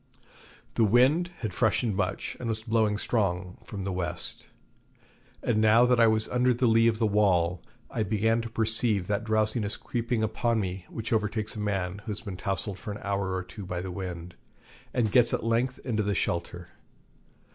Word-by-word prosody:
The 115 - +2
wind 130 - +4
had 110 -5 -3
freshened 110 0 +1
much, 95 -2 -2
and 120 - -3
was 110 0 -3
blowing 110 -3 +1
strong 90 -5 -1
from 100 -2 -6
the 95 - -2
west; 85 -2 -4 1.0
and 110 -3 +2
now 110 +3 +6
that 125 -1 +3
I 115 - +7
was 110 0 +2
under 125 0 +2
the 125 - +1
lee 115 0 +5
of 115 -1 +2
the 110 - +1
wall 95 -5 +2 0.3
I 115 - -2
began 110 +2 +1
to 115 - -6
perceive 110 -3 +1
that 100 +3 -1
drowsiness 110 -1 0
creeping 120 -1 -2
upon 110 +1 0
me 95 -2 -4
which 115 +1 -4
overtakes 110 0 -1
a - - -5
man 100 -2 -2
who 110 - -10
has 100 - -6
been 100 -4 -6
tousled 95 +1 -3
for 105 - -6
an 105 - -6
hour 100 -2 -1
or 95 - -2
two 100 +3 -9
by 90 -1 -4
the 90 +1 -5
wind, 90 -2 -6 0.6
and 110 -4 +1
gets 120 -2 +4
at - - -5
length 120 +3 +1
into 105 -5 0
shelter. 85 +1 -2
110 Hz, 185 wpm, -28 LUFS, 95-115 Hz, 1.0 s, I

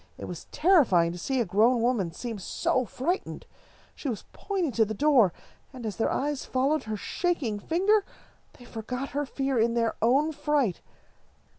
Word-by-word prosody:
It - - -7
was - - -7
terrifying 255 - +4
to 175 - -7
see 265 +8 -1
a 235 - +2
grown 220 +6 +3
woman 230 -9 +1
seem 225 +5 -6
so 255 +6 0
frightened. 330 - -3 0.5
She 285 - -5
was 225 - -5
pointing 375 -7 -2
to 230 -1 +3
the 220 0 -3
door, 265 - +4 0.4
and, 255 -4 -9
as 215 - -4
their 225 - +1
eyes 285 0 -1
followed 275 +3 0
her 215 -1 -3
shaking 265 - -1
finger, 390 - +2 0.5
they 245 - -15
forgot 250 +4 -5
her 290 0 -2
fear 270 -2 -1
in 230 +1 +2
their 230 -1 +1
own 275 +8 +3
fright. 295 - 0
255 Hz, 170 wpm, -27 LUFS, 220-295 Hz, 0.5 s, terrifying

